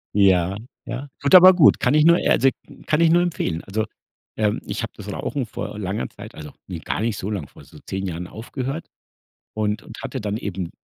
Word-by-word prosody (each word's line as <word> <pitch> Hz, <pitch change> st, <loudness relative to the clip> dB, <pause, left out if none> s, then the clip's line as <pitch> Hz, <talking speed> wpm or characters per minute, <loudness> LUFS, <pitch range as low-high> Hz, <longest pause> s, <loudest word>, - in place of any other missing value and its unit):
Ja, 95 Hz, -2 st, +4 dB, 0.3 s
ja. 130 Hz, +4 st, -6 dB
Gut, 140 Hz, +6 st, +5 dB
aber 185 Hz, +1 st, +10 dB
gut. 165 Hz, -5 st, +6 dB
Kann 125 Hz, -, +3 dB
ich 155 Hz, +1 st, +5 dB
nur 170 Hz, 0 st, +7 dB
also 135 Hz, -, +4 dB, 0.4 s
kann 155 Hz, +2 st, +2 dB
ich 165 Hz, -, +5 dB
nur 175 Hz, +1 st, +5 dB
empfehlen. 90 Hz, -, -1 dB
Also, 110 Hz, +3 st, -1 dB, 0.5 s
ähm, 105 Hz, -1 st, +1 dB
ich -, -, -4 dB
habe -, -, -5 dB
das -, -, -7 dB
Rauchen 135 Hz, -4 st, -3 dB
vor 105 Hz, -, -6 dB
langer 100 Hz, +1 st, -3 dB
Zeit -, -, -11 dB
also, 75 Hz, -1 st, -9 dB, 0.2 s
ne, 90 Hz, -4 st, -5 dB
gar 95 Hz, -, -3 dB
nicht 110 Hz, -2 st, -1 dB
so 100 Hz, -, -4 dB
lang, 95 Hz, -9 st, -3 dB
vor -, -, -16 dB
so -, -, -15 dB
10 95 Hz, +1 st, -3 dB
Jahren 90 Hz, +1 st, -5 dB
aufgehört 130 Hz, -, -5 dB, 0.7 s
und 105 Hz, 0 st, -1 dB
und 110 Hz, -, -11 dB
hatte 130 Hz, -, -4 dB
dann 105 Hz, 0 st, -2 dB
eben 95 Hz, -5 st, -4 dB
110 Hz, 210 wpm, -22 LUFS, 95-140 Hz, 0.7 s, aber